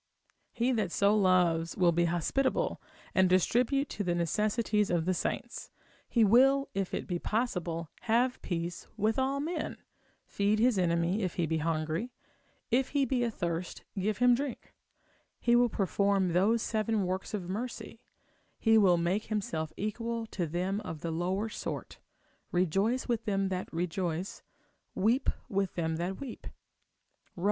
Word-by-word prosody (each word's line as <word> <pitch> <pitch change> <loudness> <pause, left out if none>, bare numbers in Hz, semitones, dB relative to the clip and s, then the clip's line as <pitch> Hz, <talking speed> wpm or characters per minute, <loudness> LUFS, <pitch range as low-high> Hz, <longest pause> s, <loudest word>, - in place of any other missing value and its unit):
He 240 +2 +1
that 215 -7 0
so 200 +3 +3
loves 180 -4 +2
will 180 -3 +4
be 170 +1 +2
hospitable, 260 - 0 0.3
and 190 -1 +4
distribute 245 - +2
to 205 - -3
the 175 -2 0
necessities 210 +4 +1
of 170 -2 +1
the 185 - +2
saints; 240 +7 -3 0.4
he 235 - +3
will, 270 +6 +5
if 195 -1 -2
it - - -3
be 175 -2 -2
possible, 180 -8 -2 0.2
have 245 +3 +2
peace 170 -1 -4
with 220 +4 +1
all 270 +1 +1
men, 325 +5 -3 0.5
feed 205 +1 +1
his 230 -2 +3
enemy 170 +3 +1
if 185 -4 -2
he 175 - +1
be 160 0 -1
hungry, 160 +6 -1 0.6
if 255 +2 +2
he 280 -1 +2
be 260 -2 0
athirst 175 -6 -3
give 205 +2 -1
him 245 0 +5
drink; 270 +1 -3 0.7
he 240 0 +3
will 245 0 +4
perform 200 -1 +1
those 215 +6 +3
seven 220 -1 0
works 185 +4 -3
of 185 -4 -5
mercy, 230 +3 -5 0.6
he 225 -1 +4
will 185 -4 +5
make 175 +5 0
himself 165 -7 -2
equal 230 +2 -3
to 180 -6 -3
them 180 +5 -1
of 160 -6 -7
the 165 - -3
lower 185 +6 -1
sort, 220 - -6 0.5
rejoice 195 +8 +1
with 235 -2 -1
them 195 -2 0
that 185 -1 -4
rejoice, 175 +1 -3 0.5
weep 235 +7 +2 0.2
with 195 -1 -1
them 160 -2 -1
that 180 +3 -3
weep, 270 -4 -8 0.9
Rom. - - -10
195 Hz, 155 wpm, -30 LUFS, 175-230 Hz, 0.9 s, will